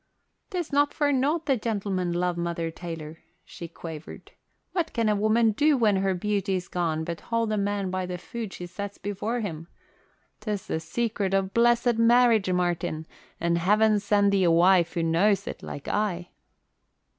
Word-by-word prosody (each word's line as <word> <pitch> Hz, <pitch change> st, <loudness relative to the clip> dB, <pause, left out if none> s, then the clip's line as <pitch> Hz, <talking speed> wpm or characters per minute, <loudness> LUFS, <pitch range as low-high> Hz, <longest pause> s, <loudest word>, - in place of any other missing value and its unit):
"'Tis 350 Hz, -6 st, -4 dB
not 285 Hz, +1 st, +2 dB
for 290 Hz, -1 st, +2 dB
nought 290 Hz, +5 st, +1 dB
the 275 Hz, -, +3 dB
gentlemen 200 Hz, -6 st, -2 dB
love 175 Hz, 0 st, 0 dB
Mother 170 Hz, -1 st, -2 dB
Taylor," 165 Hz, -2 st, -8 dB, 0.3 s
she 170 Hz, -, -9 dB
quavered. 160 Hz, -2 st, -9 dB, 0.4 s
"What 345 Hz, -3 st, -2 dB
can 230 Hz, -2 st, +1 dB
a 210 Hz, -, +3 dB
woman 220 Hz, +2 st, +3 dB
do 290 Hz, +6 st, +3 dB
when 215 Hz, -5 st, +3 dB
her 190 Hz, 0 st, +1 dB
beauty's 195 Hz, -1 st, -1 dB
gone 165 Hz, -3 st, -1 dB
but 170 Hz, 0 st, -5 dB
hold 230 Hz, -1 st, -1 dB
a 215 Hz, -, 0 dB
man 200 Hz, -1 st, -1 dB
by 185 Hz, -1 st, -2 dB
the 180 Hz, 0 st, -4 dB
food 225 Hz, +3 st, -6 dB
she 180 Hz, -, -7 dB
sets 200 Hz, +3 st, -7 dB
before 210 Hz, +4 st, -3 dB
him? 165 Hz, -5 st, -5 dB, 0.7 s
'Tis 210 Hz, -3 st, -4 dB
the 160 Hz, -, -2 dB
secret 200 Hz, +3 st, -1 dB
of 195 Hz, 0 st, 0 dB
blessed 235 Hz, 0 st, +3 dB
marriage, 230 Hz, -4 st, +4 dB
Martin, 175 Hz, -3 st, -1 dB, 0.3 s
and 170 Hz, 0 st, +1 dB
heaven 210 Hz, +4 st, +3 dB
send 205 Hz, 0 st, +2 dB
thee 195 Hz, -1 st, +2 dB
a 175 Hz, -, +4 dB
wife 175 Hz, +1 st, +4 dB
as 165 Hz, -, +1 dB
knows 185 Hz, +5 st, +2 dB
it -, -, -6 dB
like 140 Hz, -, -8 dB
I!" 180 Hz, -4 st, -1 dB
200 Hz, 170 wpm, -26 LUFS, 175-225 Hz, 0.7 s, marriage